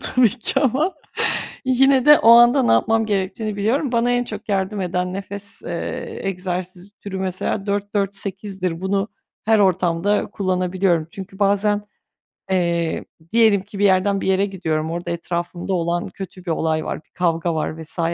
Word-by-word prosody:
tabii 250 -3 +6
ki 235 +2 -2
ama. 290 +7 +1 0.7
Yine 260 0 +4
de 295 0 +8
o 230 - +6
anda 240 +3 +7
ne - - +3
yapmam 225 - +3
gerektiğini 210 +1 -2
biliyorum. 240 +7 0
Bana 240 0 +2
en 245 0 +2
çok 215 -1 -8
yardım 195 +1 -1
eden 180 0 -2
nefes, 200 +1 -5
eee, - - -5
egzersiz 185 0 -4
türü 195 -2 -5
mesela 190 +2 -2
4-4-8'dir. 200 -3 -2
Bunu 195 +1 0 0.4
her 220 0 +4
ortamda 185 +1 +2
kullanabiliyorum. 185 -3 0
Çünkü 195 0 -9
bazen, 205 +1 +2 0.7
eee, 170 -3 0 0.3
diyelim 220 -4 +4
ki 200 0 -10
bir 205 - +3
yerden 195 +1 +3
bir - - -3
yere 190 +1 +3
gidiyorum, 160 -5 -2
orada 170 0 -4
etrafımda 175 +2 -3
olan 170 0 -1
kötü 185 -1 -9
bir 170 - -1
olay 160 0 0
var, - - -4
bir - - -42
kavga 170 -1 0
var 155 +1 -3
vs. 160 +2 -11
195 Hz, 155 wpm, -21 LUFS, 180-210 Hz, 0.7 s, de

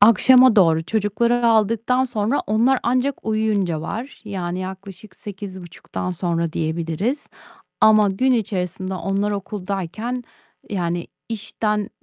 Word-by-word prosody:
Akşama 240 +3 +7
doğru, 165 -4 +5
çocukları 230 +4 +1
aldıktan 230 +3 +2
sonra 230 +2 0
onlar 235 +5 +3
ancak 255 +3 0
uyuyunca 210 -7 0
var. 230 - -6
Yani, 180 -4 -4
yaklaşık 190 +2 -8
8.30'dan 190 -3 -7
sonra 170 -2 -1
diyebiliriz. 165 - -2 0.6
Ama 215 -2 +6
gün 255 +7 +1
içerisinde 190 -4 -2
onlar 195 +3 -1
okuldayken, 205 +4 -4 0.5
yani, 175 -3 -2 0.2
işten, 210 -1 -2
205 Hz, 105 wpm, -21 LUFS, 185-230 Hz, 0.6 s, Akşama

